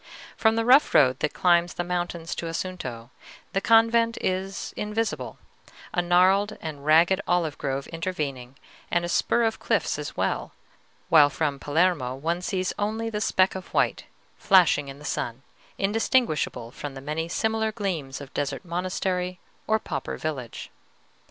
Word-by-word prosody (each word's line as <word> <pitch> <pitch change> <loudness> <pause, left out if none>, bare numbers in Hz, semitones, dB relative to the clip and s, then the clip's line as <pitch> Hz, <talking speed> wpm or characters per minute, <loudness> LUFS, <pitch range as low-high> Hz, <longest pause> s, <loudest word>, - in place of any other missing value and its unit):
From 220 0 +3
the 225 0 0
rough 265 +5 +5
road 130 -3 +5
that 150 - -1
climbs 175 -1 +3
the 175 - -2
mountains 175 -1 -3
to 170 - -4
Assunto, 140 -9 -5 0.4
the 195 - +1
convent 230 +1 +4
is 190 +1 -3
invisible, 215 +2 -3 0.6
a 175 - +2
gnarled 185 +4 +3
and 150 -3 -7
ragged 170 +6 +4
olive 170 -4 +1
grove 135 0 -2
intervening, 145 -7 -4 0.3
and 175 0 +1
a - - -2
spur 235 +6 +2
of 225 -1 0
cliffs - - 0
as - - -6
well, - - -1 0.6
while 150 -3 +7
from 145 -1 -2
Palermo 145 -4 +1
one 165 +6 -2
sees 185 -2 -2
only 220 +2 -2
the 210 -1 -3
speck 190 -3 +3
of 190 -1 -8
white, - - +1 0.3
flashing 175 -7 +4
in 135 0 -8
the 150 - -12
sun, 120 -1 -3 0.3
indistinguishable 200 - 0
from 140 +1 -7
the - - -6
many 155 +4 -3
similar 220 +3 0
gleams 175 -11 -3
of 140 -2 -11
desert 145 +5 -3
monastery 180 +1 -2 0.3
or 220 - +3
pauper 145 -10 -5
village. 135 -7 -5
175 Hz, 150 wpm, -25 LUFS, 145-195 Hz, 0.6 s, while